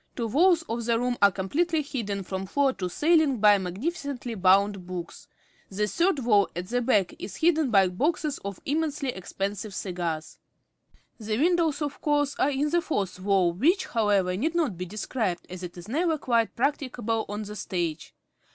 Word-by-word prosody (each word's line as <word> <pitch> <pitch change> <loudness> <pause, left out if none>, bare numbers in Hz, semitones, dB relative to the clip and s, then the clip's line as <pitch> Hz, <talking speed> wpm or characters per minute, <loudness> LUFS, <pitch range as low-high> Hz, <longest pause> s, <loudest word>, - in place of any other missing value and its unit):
Two 235 - -2
walls 335 - +4
of 235 -6 -4
the 230 -1 +2
room 245 +1 0
are 200 - +8
completely 305 - 0
hidden 220 -9 -4
from 190 +1 -5
floor 275 +4 +2
to 185 -5 -4
ceiling 310 - +3
by 205 -1 +5
magnificently 250 - -4
bound 195 -1 +3
books; 175 -2 -7 0.4
the 205 +2 -1
third 340 - +1
wall 215 -6 +3
at 175 +1 -5
the 245 +1 0
back 210 -7 +2
is 200 - -7
hidden 320 -4 +2
by 195 -4 +5
boxes 295 - -1
of 200 -1 -6
immensely 295 -2 -1
expensive 195 -1 -4
cigars. 170 -4 -4 0.8
The 215 -1 -2
windows, 325 0 +2
of 290 -1 -5
course, 290 -1 +1
are 275 - +3
in 290 +1 0
the 345 0 +3
fourth 205 - -2
wall, 185 -3 +2
which, 325 - +2
however, 200 -5 +1
need 315 - -1
not 310 - +1
be 180 +1 -5
described, 205 -1 -3
as 185 0 -7
it 180 -1 -8
is 175 +2 -10
never 320 +6 +1
quite 235 -5 0
practicable 245 -4 -1
on 210 +1 -4
the 210 0 -8
stage. 175 -5 -4
225 Hz, 175 wpm, -26 LUFS, 190-290 Hz, 0.8 s, are